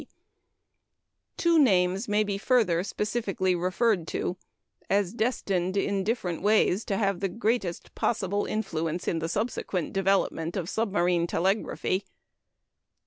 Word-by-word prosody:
P. -, -, -13 dB, 1.3 s
Two 340 Hz, -1 st, +4 dB
names 190 Hz, -5 st, +3 dB
may 210 Hz, 0 st, +2 dB
be 200 Hz, -1 st, -3 dB
further 200 Hz, -8 st, +2 dB
specially 205 Hz, -3 st, -1 dB
referred 180 Hz, +1 st, +1 dB
to 180 Hz, -, -2 dB, 0.5 s
as 200 Hz, -1 st, +1 dB
destined, 200 Hz, -6 st, -1 dB
in 195 Hz, 0 st, 0 dB
different 190 Hz, -6 st, -2 dB
ways, 210 Hz, 0 st, +3 dB
to 195 Hz, -, -1 dB
have 195 Hz, -3 st, 0 dB
the 195 Hz, 0 st, -1 dB
greatest 210 Hz, -3 st, -2 dB
possible 205 Hz, -3 st, 0 dB
influence 170 Hz, -5 st, -2 dB
in 165 Hz, -, 0 dB
the 165 Hz, 0 st, -3 dB
subsequent 200 Hz, -3 st, -2 dB
development 195 Hz, -3 st, 0 dB
of 175 Hz, -3 st, -3 dB
submarine 180 Hz, -6 st, +1 dB
telegraphy. 190 Hz, +1 st, 0 dB
195 Hz, 125 wpm, -27 LUFS, 180-215 Hz, 1.3 s, Two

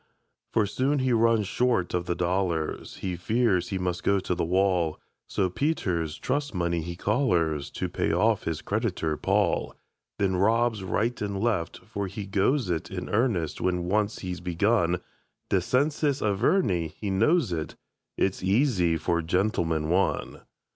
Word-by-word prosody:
For 110 Hz, -, +2 dB
soon 130 Hz, +8 st, 0 dB
he 130 Hz, -2 st, +1 dB
runs 115 Hz, -2 st, +3 dB
short 120 Hz, -6 st, +1 dB
of 90 Hz, 0 st, -1 dB
the 85 Hz, -, 0 dB
dollars, 90 Hz, -2 st, -1 dB
He 90 Hz, -2 st, -3 dB
fears 100 Hz, 0 st, +1 dB
he 95 Hz, -, -2 dB
must 90 Hz, -1 st, -2 dB
go 100 Hz, 0 st, +2 dB
to 90 Hz, -, -2 dB
the -, -, -1 dB
wall; 90 Hz, -2 st, +1 dB, 0.3 s
So 95 Hz, -, +1 dB
Peter's 90 Hz, -, -1 dB
trust 140 Hz, -2 st, -2 dB
money 85 Hz, -1 st, 0 dB
he 85 Hz, +2 st, -5 dB
collars 85 Hz, -, +1 dB
To -, -, -3 dB
pay -, -, -1 dB
off -, -, +2 dB
his 80 Hz, -1 st, -3 dB
creditor, 100 Hz, -8 st, -1 dB
Paul; -, -, 0 dB, 0.4 s
Then 95 Hz, -2 st, +1 dB
robs 110 Hz, +2 st, +2 dB
right 115 Hz, +5 st, -1 dB
and 100 Hz, -1 st, -2 dB
left 105 Hz, -6 st, -1 dB
for 100 Hz, -2 st, -4 dB
he 100 Hz, +2 st, -6 dB
goes 100 Hz, +6 st, +1 dB
it 80 Hz, -2 st, -2 dB
In -, -, -5 dB
earnest 100 Hz, -, 0 dB
when 90 Hz, -1 st, 0 dB
once 105 Hz, +4 st, 0 dB
he's 90 Hz, -2 st, -4 dB
begun. 90 Hz, 0 st, +1 dB, 0.5 s
Descensus 140 Hz, -, +1 dB
Averni 100 Hz, -, +1 dB
he 100 Hz, +6 st, -5 dB
knows 135 Hz, -, +3 dB
it; 80 Hz, -2 st, -4 dB, 0.4 s
It's 95 Hz, -, 0 dB
easy 95 Hz, -, +2 dB
for 85 Hz, +2 st, 0 dB
"Gentleman, 80 Hz, -3 st, 0 dB
One". 95 Hz, +2 st, 0 dB
95 Hz, 155 wpm, -27 LUFS, 85-115 Hz, 0.5 s, runs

